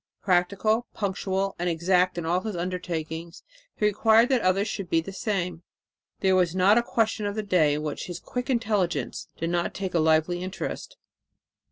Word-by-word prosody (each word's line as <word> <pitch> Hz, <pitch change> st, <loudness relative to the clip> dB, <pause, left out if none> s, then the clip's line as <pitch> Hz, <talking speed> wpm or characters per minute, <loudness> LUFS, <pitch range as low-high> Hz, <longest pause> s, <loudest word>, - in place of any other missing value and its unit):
Practical, 200 Hz, +5 st, +1 dB
punctual 195 Hz, -1 st, -1 dB
and 175 Hz, +1 st, 0 dB
exact 180 Hz, +2 st, +2 dB
in 170 Hz, -, -3 dB
all 175 Hz, +2 st, +2 dB
his 215 Hz, -1 st, -4 dB
undertakings, 170 Hz, -1 st, -4 dB, 0.3 s
he 210 Hz, -, 0 dB
required 220 Hz, +3 st, +4 dB
that 260 Hz, -3 st, +2 dB
others 190 Hz, +3 st, +2 dB
should 195 Hz, -4 st, -4 dB
be 165 Hz, -, +3 dB
the 195 Hz, +4 st, -6 dB
same. 180 Hz, -5 st, -2 dB, 0.6 s
There 190 Hz, -1 st, +3 dB
was 180 Hz, -2 st, +2 dB
not 195 Hz, +5 st, +5 dB
a -, -, +2 dB
question 225 Hz, -2 st, 0 dB
of 205 Hz, -, -3 dB
the 215 Hz, -, -2 dB
day 165 Hz, -7 st, +3 dB
in 150 Hz, -, -3 dB
which 150 Hz, -1 st, -4 dB
his 175 Hz, -1 st, -6 dB
quick 250 Hz, +1 st, -5 dB
intelligence 215 Hz, -8 st, -1 dB
did 165 Hz, +1 st, -2 dB
not 175 Hz, 0 st, -1 dB
take 190 Hz, -2 st, -4 dB
a 170 Hz, -, +2 dB
lively 160 Hz, +2 st, +2 dB
interest. 190 Hz, -, -5 dB
185 Hz, 180 wpm, -26 LUFS, 170-210 Hz, 0.6 s, not